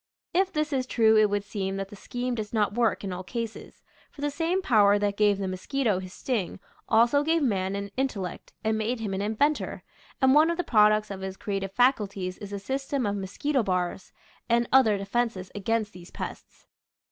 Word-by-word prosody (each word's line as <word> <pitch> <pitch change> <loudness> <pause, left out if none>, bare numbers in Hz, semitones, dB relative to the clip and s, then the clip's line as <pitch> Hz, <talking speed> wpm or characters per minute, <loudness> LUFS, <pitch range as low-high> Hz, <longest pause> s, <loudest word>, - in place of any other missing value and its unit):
If 380 +2 +2
this 305 -1 -1
is 260 -1 0
true 220 -3 +4
it 215 -1 +5
would 205 0 -1
seem 195 -2 -3
that 195 0 -4
the 205 - -10
scheme 245 +4 -4
does 215 -2 -5
not 210 -3 +1
work 230 -2 +1
in 190 -2 -3
all 180 - -5
cases, 230 +2 -6 0.3
for 285 - -13
the 290 0 0
same 335 +6 -1
power 205 - +5
that 205 0 0
gave 205 -1 +3
the 195 -1 -3
mosquito 205 +3 -1
his 185 -1 -8
sting 210 -4 -3 0.3
also 235 +5 +4
gave 320 +1 +1
man 195 -6 0
an 200 0 -5
in 265 +1 +2
tellect 190 -8 -7
and 220 0 +1
made 230 +3 -1
him 210 -3 -3
an 190 - -2
inventor, 220 +9 0 0.4
and 265 -1 +5
one 310 +3 +6
of 340 - -1
the 355 - 0
products 215 -3 +4
of 190 -1 -6
his 190 0 -5
creative 195 -2 -3
faculties 200 -7 +1
is 205 -1 -8
a - - -3
sys 265 +7 -4
tem 275 -4 0
of 205 0 0
mosquito 255 +8 -1
bars 180 -2 -2 0.4
and 235 0 +3
other 225 -6 +5
defenses 200 -2 -2
against 215 +1 -1
these 175 0 -12
pests. - - -8
215 Hz, 205 wpm, -27 LUFS, 195-255 Hz, 0.4 s, one